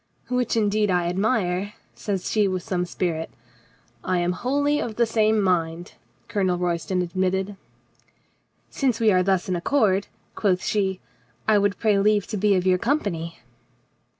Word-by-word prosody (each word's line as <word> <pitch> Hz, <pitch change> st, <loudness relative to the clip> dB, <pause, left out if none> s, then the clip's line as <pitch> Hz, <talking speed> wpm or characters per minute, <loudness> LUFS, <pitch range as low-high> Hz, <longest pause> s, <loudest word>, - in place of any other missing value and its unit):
"Which 250 Hz, -2 st, 0 dB
indeed 210 Hz, -1 st, +2 dB
I 180 Hz, -2 st, +1 dB
admire," 195 Hz, +1 st, 0 dB, 0.2 s
says 195 Hz, -3 st, -3 dB
she 210 Hz, -2 st, +3 dB
with 185 Hz, -2 st, -2 dB
some 180 Hz, -1 st, -1 dB
spirit. 165 Hz, -2 st, -2 dB, 0.7 s
"I 185 Hz, 0 st, 0 dB
am 175 Hz, 0 st, +1 dB
wholly 285 Hz, +9 st, 0 dB
of 220 Hz, -, -4 dB
the 235 Hz, -, +3 dB
same 220 Hz, -1 st, +2 dB
mind," 175 Hz, -3 st, 0 dB, 0.3 s
Colonel 190 Hz, -5 st, 0 dB
Royston 180 Hz, +1 st, -1 dB
admitted. 190 Hz, +2 st, -1 dB, 1.2 s
"Since 255 Hz, -5 st, 0 dB
we 220 Hz, -2 st, +4 dB
are 185 Hz, -1 st, +4 dB
thus 190 Hz, -1 st, +1 dB
in 185 Hz, -, 0 dB
accord," 195 Hz, 0 st, +1 dB, 0.3 s
quoth 185 Hz, -4 st, 0 dB
she, 190 Hz, -3 st, 0 dB, 0.5 s
"I 215 Hz, -1 st, +5 dB
would 200 Hz, 0 st, +1 dB
pray 210 Hz, -3 st, +2 dB
leave 210 Hz, 0 st, +3 dB
to 215 Hz, -, -2 dB
be 205 Hz, 0 st, +3 dB
of 180 Hz, -1 st, 0 dB
your 185 Hz, -1 st, +3 dB
company." 190 Hz, -, -1 dB
195 Hz, 150 wpm, -24 LUFS, 180-215 Hz, 1.2 s, I